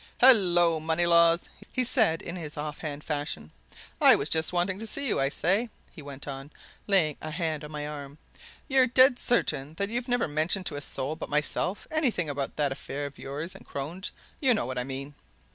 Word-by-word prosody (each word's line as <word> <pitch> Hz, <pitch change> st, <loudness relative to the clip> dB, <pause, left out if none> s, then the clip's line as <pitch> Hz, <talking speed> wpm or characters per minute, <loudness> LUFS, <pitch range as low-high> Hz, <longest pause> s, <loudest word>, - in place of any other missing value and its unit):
"Hullo, 175 Hz, -10 st, +5 dB
Moneylaws!" 170 Hz, +1 st, +3 dB, 0.2 s
he 255 Hz, -, 0 dB
said 220 Hz, -, +4 dB
in 170 Hz, -, -5 dB
his 155 Hz, -5 st, -7 dB
off 150 Hz, 0 st, -5 dB
hand 150 Hz, -1 st, -6 dB
fashion. 145 Hz, -, -4 dB, 0.5 s
"I -, -, +9 dB
was 140 Hz, -, -1 dB
just 160 Hz, 0 st, +1 dB
wanting 180 Hz, +2 st, 0 dB
to 225 Hz, -, -5 dB
see 280 Hz, +5 st, -2 dB
you. -, -, 0 dB
I 135 Hz, 0 st, +2 dB
say!" 195 Hz, +10 st, 0 dB, 0.2 s
he -, -, -11 dB
went 140 Hz, -1 st, -10 dB
on, 135 Hz, 0 st, -7 dB, 0.4 s
laying 175 Hz, -8 st, +2 dB
a 155 Hz, -, -5 dB
hand 160 Hz, -2 st, -3 dB
on 150 Hz, -, -8 dB
my 150 Hz, -1 st, -5 dB
arm, 145 Hz, -1 st, -8 dB, 0.5 s
"you're 265 Hz, -3 st, +4 dB
dead 255 Hz, +1 st, +5 dB
certain 155 Hz, -, 0 dB
that 200 Hz, +3 st, -1 dB
you've 240 Hz, +2 st, -2 dB
never 245 Hz, -1 st, +1 dB
mentioned 160 Hz, +6 st, +1 dB
to -, -, -1 dB
a 145 Hz, -, -4 dB
soul 145 Hz, +1 st, -3 dB
but -, -, -7 dB
myself 150 Hz, +6 st, -1 dB
anything 245 Hz, -, 0 dB
about 140 Hz, -1 st, -4 dB
that 145 Hz, -2 st, 0 dB
affair 140 Hz, +1 st, -5 dB
of 140 Hz, 0 st, -9 dB
yours 150 Hz, +6 st, -5 dB
and -, -, -13 dB
Crone's 160 Hz, +8 st, -5 dB, 0.3 s
you 260 Hz, -5 st, +4 dB
know -, -, -1 dB
what 130 Hz, 0 st, -3 dB
I -, -, -1 dB
mean?" 135 Hz, +2 st, -6 dB
160 Hz, 200 wpm, -27 LUFS, 145-200 Hz, 0.5 s, I